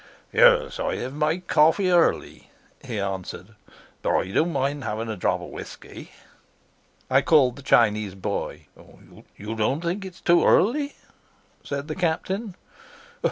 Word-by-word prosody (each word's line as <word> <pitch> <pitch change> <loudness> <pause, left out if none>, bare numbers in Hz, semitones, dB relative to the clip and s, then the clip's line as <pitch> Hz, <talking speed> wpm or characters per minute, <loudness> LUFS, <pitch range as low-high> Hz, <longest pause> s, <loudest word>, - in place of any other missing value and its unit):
"Yes; - - +4
I - - -1
have 130 +2 -5
my 150 +3 0
coffee 180 +2 +3
early," 175 -2 +1 0.3
he 120 -6 -4
answered, 95 -1 -5 0.5
"but - - +1
I 95 - -2
don't 165 - +1
mind 140 0 -1
having 110 0 -4
a 110 - -3
drop 90 - -1
of - - -9
whisky." - - -10 1.0
I 130 +1 +3
called 135 -5 +4
the 140 - -11
Chinese 105 -6 +2
boy. 95 - -4 0.7
"You 105 +2 -6
don't 120 +8 0
think 180 +4 -3
it's 185 -2 -10
too 175 0 +4
early?" 280 +8 +2 0.7
said 140 +1 -5
the 155 - -3
Captain. 185 +4 -2
145 Hz, 140 wpm, -24 LUFS, 115-175 Hz, 1.0 s, Yes